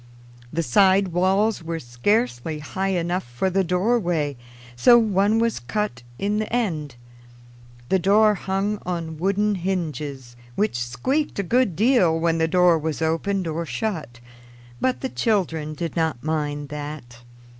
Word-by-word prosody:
The 165 Hz, +1 st, -1 dB
side 190 Hz, +7 st, +4 dB
walls 190 Hz, +4 st, +1 dB
were 165 Hz, 0 st, -4 dB
scarcely 155 Hz, -, -1 dB
high 190 Hz, +6 st, -3 dB
enough 175 Hz, +2 st, -1 dB
for 120 Hz, +10 st, -2 dB
the 195 Hz, +1 st, +2 dB
doorway, 180 Hz, -, 0 dB, 0.4 s
so 240 Hz, -, +6 dB
one 210 Hz, -1 st, +2 dB
was 230 Hz, 0 st, +1 dB
cut 120 Hz, -, -3 dB, 0.2 s
in 205 Hz, +7 st, -1 dB
the 215 Hz, 0 st, -3 dB
end. 160 Hz, -, -1 dB, 0.9 s
The 190 Hz, -, +3 dB
door 210 Hz, +3 st, +4 dB
hung 195 Hz, +2 st, -2 dB
on 165 Hz, -3 st, -4 dB
wooden 200 Hz, +3 st, +1 dB
hinges, 155 Hz, -9 st, -4 dB, 0.2 s
which 210 Hz, -, 0 dB
squeaked 260 Hz, -, -1 dB
a 200 Hz, -, 0 dB
good 235 Hz, -1 st, +1 dB
deal 195 Hz, -, +3 dB
when 165 Hz, 0 st, +1 dB
the 160 Hz, -, +2 dB
door 175 Hz, -1 st, +4 dB
was 155 Hz, 0 st, -3 dB
opened 170 Hz, +4 st, 0 dB
or 165 Hz, +1 st, -2 dB
shut; 160 Hz, -, -4 dB, 0.6 s
but 260 Hz, -1 st, 0 dB
the 265 Hz, -, -2 dB
children 165 Hz, -11 st, -1 dB
did 170 Hz, +1 st, -4 dB
not 160 Hz, -7 st, -1 dB
mind 145 Hz, -2 st, -2 dB
that. 145 Hz, -5 st, -7 dB
175 Hz, 145 wpm, -23 LUFS, 155-205 Hz, 0.9 s, so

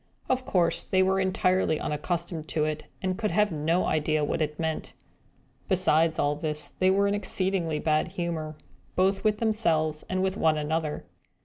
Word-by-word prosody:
Of 255 Hz, 0 st, 0 dB
course, 180 Hz, -10 st, +2 dB
they 185 Hz, 0 st, +2 dB
were 190 Hz, +1 st, +2 dB
entirely 185 Hz, -3 st, +1 dB
unaccustomed 165 Hz, +1 st, -3 dB
to 155 Hz, -1 st, 0 dB
it, 155 Hz, 0 st, -3 dB, 0.2 s
and 185 Hz, +1 st, -1 dB
could 215 Hz, -2 st, 0 dB
have 210 Hz, -1 st, +2 dB
no 165 Hz, +3 st, +1 dB
idea 155 Hz, 0 st, +1 dB
what 160 Hz, -, -2 dB
it 150 Hz, -1 st, -2 dB
meant. 160 Hz, -1 st, -3 dB, 0.8 s
Besides 165 Hz, -4 st, +3 dB
all 145 Hz, +1 st, +1 dB
this, 150 Hz, 0 st, -3 dB
they 185 Hz, -, +4 dB
were 200 Hz, +1 st, +3 dB
in 200 Hz, -, +1 dB
exceedingly 190 Hz, -5 st, 0 dB
bad 155 Hz, 0 st, +1 dB
humour, 160 Hz, -3 st, -4 dB, 0.4 s
both 190 Hz, +1 st, +2 dB
with 215 Hz, -1 st, +2 dB
themselves 165 Hz, -9 st, +1 dB
and 185 Hz, 0 st, 0 dB
with 190 Hz, +1 st, -1 dB
one 160 Hz, -1 st, +3 dB
another. 150 Hz, 0 st, -2 dB
170 Hz, 170 wpm, -27 LUFS, 155-190 Hz, 0.8 s, they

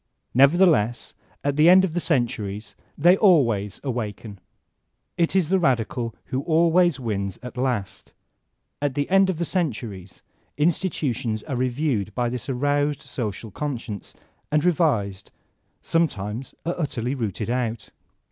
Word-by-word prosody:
Nevertheless, 140 Hz, -, +4 dB, 0.3 s
at 145 Hz, 0 st, 0 dB
the 155 Hz, +3 st, +6 dB
end 190 Hz, +1 st, +7 dB
of 170 Hz, -, -4 dB
the 175 Hz, -, 0 dB
centuries 115 Hz, -, -2 dB, 0.2 s
they 175 Hz, +5 st, +6 dB
always 120 Hz, -, +3 dB
awaken. 110 Hz, -5 st, -4 dB, 0.8 s
It 170 Hz, +2 st, +1 dB
is 180 Hz, -5 st, +2 dB
the 190 Hz, 0 st, +3 dB
radical 120 Hz, -5 st, 0 dB, 0.2 s
who 130 Hz, -, +1 dB
always 170 Hz, 0 st, +3 dB
wins 100 Hz, -6 st, -3 dB
at 125 Hz, -, -8 dB
last 125 Hz, -6 st, -3 dB, 0.7 s
At 145 Hz, -2 st, -1 dB
the 145 Hz, -, 0 dB
end 195 Hz, 0 st, +5 dB
of 185 Hz, -, -1 dB
the 170 Hz, -, -1 dB
centuries 110 Hz, -, -4 dB, 0.3 s
institutions 145 Hz, -, 0 dB
are 135 Hz, -, -4 dB
reviewed 125 Hz, -4 st, -1 dB
by 120 Hz, -1 st, 0 dB
this 125 Hz, +1 st, -5 dB
aroused 145 Hz, +2 st, 0 dB
social 110 Hz, -2 st, -5 dB
conscience, 115 Hz, -6 st, -5 dB, 0.4 s
are 150 Hz, -, +3 dB
revised, 140 Hz, -, +1 dB, 0.5 s
sometimes 120 Hz, -7 st, -1 dB
are 170 Hz, -, 0 dB
utterly 130 Hz, -5 st, -2 dB
rooted 115 Hz, -3 st, -3 dB
out. 120 Hz, -3 st, -2 dB
130 Hz, 130 wpm, -24 LUFS, 110-160 Hz, 0.8 s, end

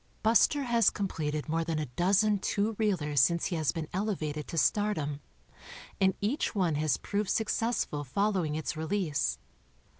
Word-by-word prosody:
Buster 235 Hz, +6 st, +4 dB
has 235 Hz, -3 st, +4 dB
completed 155 Hz, -7 st, -3 dB
more 165 Hz, +1 st, 0 dB
than 165 Hz, -1 st, -2 dB
a 155 Hz, -, -1 dB
dozen 195 Hz, -, +2 dB
two 210 Hz, +3 st, -1 dB
reelers 160 Hz, -10 st, +1 dB
since 170 Hz, +7 st, +3 dB
he 180 Hz, -, -1 dB
has 155 Hz, -3 st, +1 dB
been 165 Hz, -3 st, -5 dB
ele 205 Hz, +3 st, 0 dB
vated 150 Hz, -2 st, -4 dB
to 165 Hz, -, -6 dB
stardom, 160 Hz, -7 st, +1 dB, 0.8 s
and 190 Hz, -1 st, +3 dB
each 225 Hz, +4 st, -1 dB
one 180 Hz, -5 st, +1 dB
has 150 Hz, -2 st, +1 dB
proved 205 Hz, -1 st, -2 dB
successful 220 Hz, -8 st, 0 dB
following 180 Hz, +1 st, 0 dB
its 155 Hz, +1 st, -3 dB
release. 155 Hz, -, -1 dB
175 Hz, 155 wpm, -30 LUFS, 155-210 Hz, 0.8 s, Buster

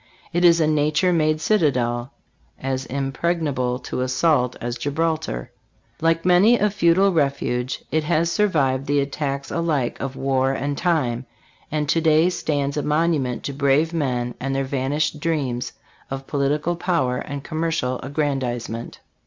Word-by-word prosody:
It 175 Hz, +1 st, +1 dB
is 170 Hz, -1 st, +6 dB
a 160 Hz, -, +3 dB
nature 155 Hz, +4 st, +2 dB
made 155 Hz, -2 st, +2 dB
citadel, 125 Hz, -, +1 dB, 0.5 s
as 130 Hz, 0 st, -3 dB
impregnable 135 Hz, -2 st, -1 dB
to -, -, -4 dB
assault 130 Hz, 0 st, +2 dB
as 120 Hz, 0 st, -4 dB
Gibralter. 155 Hz, -, -2 dB, 0.5 s
Like 165 Hz, +1 st, +2 dB
many 185 Hz, +7 st, +5 dB
a 210 Hz, -2 st, +1 dB
feudal 195 Hz, 0 st, +3 dB
refuge, 140 Hz, -4 st, -1 dB
it 155 Hz, 0 st, +1 dB
has 165 Hz, +1 st, +1 dB
survived 140 Hz, -11 st, +1 dB
the 145 Hz, 0 st, +2 dB
attacks 140 Hz, 0 st, -3 dB
alike 155 Hz, -7 st, -1 dB
of 135 Hz, -1 st, -4 dB
war 135 Hz, -1 st, +1 dB
and 140 Hz, +1 st, -2 dB
time, 135 Hz, -8 st, 0 dB, 0.4 s
and 150 Hz, -1 st, -1 dB
to 165 Hz, +3 st, +2 dB
day 160 Hz, +2 st, +4 dB
stands 145 Hz, -4 st, -1 dB
a -, -, +1 dB
monument 150 Hz, -4 st, 0 dB
to 140 Hz, -, -4 dB
brave 140 Hz, +4 st, +2 dB
men 125 Hz, -6 st, -1 dB
and 135 Hz, +1 st, -2 dB
their 135 Hz, -, 0 dB
van 130 Hz, 0 st, -2 dB
ished 150 Hz, 0 st, 0 dB
dreams 140 Hz, -7 st, -1 dB, 0.4 s
of 135 Hz, 0 st, -5 dB
political 150 Hz, +5 st, 0 dB
power 165 Hz, -8 st, 0 dB
and 140 Hz, -1 st, -6 dB
commercial 155 Hz, -6 st, -1 dB
aggrandizement. 130 Hz, -5 st, -3 dB
145 Hz, 145 wpm, -22 LUFS, 130-165 Hz, 0.5 s, is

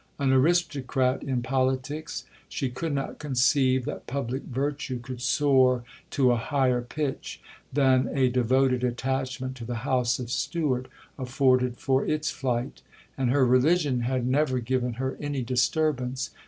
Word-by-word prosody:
An 135 Hz, -2 st, +2 dB
aristocrat 135 Hz, -4 st, +2 dB
in 130 Hz, -4 st, -2 dB
politics, 130 Hz, +4 st, -2 dB, 0.2 s
she 135 Hz, -4 st, -2 dB
could 160 Hz, +6 st, -3 dB
not 140 Hz, -1 st, -3 dB
conceive 130 Hz, -2 st, +2 dB
that -, -, -6 dB
public 130 Hz, 0 st, -3 dB
virtue 140 Hz, 0 st, -3 dB
could 120 Hz, +1 st, -8 dB
soar 130 Hz, -3 st, +3 dB, 0.3 s
to 130 Hz, -3 st, +3 dB
a 120 Hz, -, +2 dB
higher 130 Hz, 0 st, +1 dB
pitch 135 Hz, +3 st, -4 dB, 0.3 s
than 130 Hz, -2 st, +3 dB
a 135 Hz, -2 st, +2 dB
devoted 125 Hz, +1 st, +2 dB
attachment 130 Hz, +1 st, -2 dB
to 120 Hz, -, -8 dB
the 120 Hz, +1 st, -5 dB
house 125 Hz, -3 st, +1 dB
of 125 Hz, -2 st, -6 dB
Stuart 140 Hz, -5 st, -1 dB, 0.3 s
afforded 130 Hz, -1 st, +2 dB
for 135 Hz, 0 st, +1 dB
its 155 Hz, 0 st, -1 dB
flight; 125 Hz, 0 st, -3 dB, 0.3 s
and 130 Hz, -2 st, 0 dB
her 135 Hz, +1 st, +4 dB
religion 135 Hz, +2 st, +3 dB
had 125 Hz, +1 st, -1 dB
never 130 Hz, 0 st, +1 dB
given 125 Hz, 0 st, -1 dB
her 130 Hz, +3 st, -3 dB
any 145 Hz, -3 st, -3 dB
disturbance. 130 Hz, 0 st, 0 dB
130 Hz, 140 wpm, -26 LUFS, 125-140 Hz, 0.3 s, her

